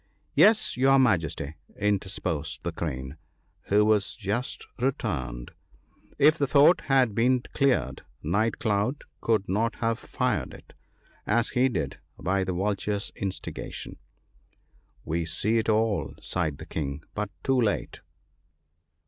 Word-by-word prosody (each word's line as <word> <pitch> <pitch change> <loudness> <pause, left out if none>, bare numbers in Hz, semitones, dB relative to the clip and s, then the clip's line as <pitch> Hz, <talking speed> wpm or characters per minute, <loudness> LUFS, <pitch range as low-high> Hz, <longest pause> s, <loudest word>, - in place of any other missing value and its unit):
' - - -42
Yes, 215 - +4
your 135 +1 +5
Majesty,' 85 - +1 0.2
interposed 90 -7 -1
the 85 - -2
Crane, 70 -4 -5 0.5
who 105 +1 +4
was 105 -2 +2
just 120 +5 -3
returned, - - -2 0.3
* - - -31
if 155 +3 +5
the 140 - +2
Fort 145 +6 +6
had 130 -5 +3
been 125 +3 +2
cleared, 135 -2 +1 0.2
Night 105 +8 +1
cloud 110 +6 0 0.2
could 110 -4 +1
not 110 +5 0
have 115 -1 -1
fired - - -2
it, - - -16 0.5
as 115 +2 +2
he 130 +2 +2
did, 80 - -3 0.2
by 95 +1 +1
the 95 0 -2
Vulture's 100 +2 -1
in 100 - -2
stigation.' - - -6 0.6
' - - -36
We 85 +2 -1
see 110 +7 +1
it 110 - -1
all,' 110 -1 +1
sighed 80 -6 -2
the - - -9
King, 70 -1 -4
but 105 -1 -3
too 130 -2 +2
late 105 -3 -1
105 Hz, 140 wpm, -27 LUFS, 85-125 Hz, 0.6 s, Fort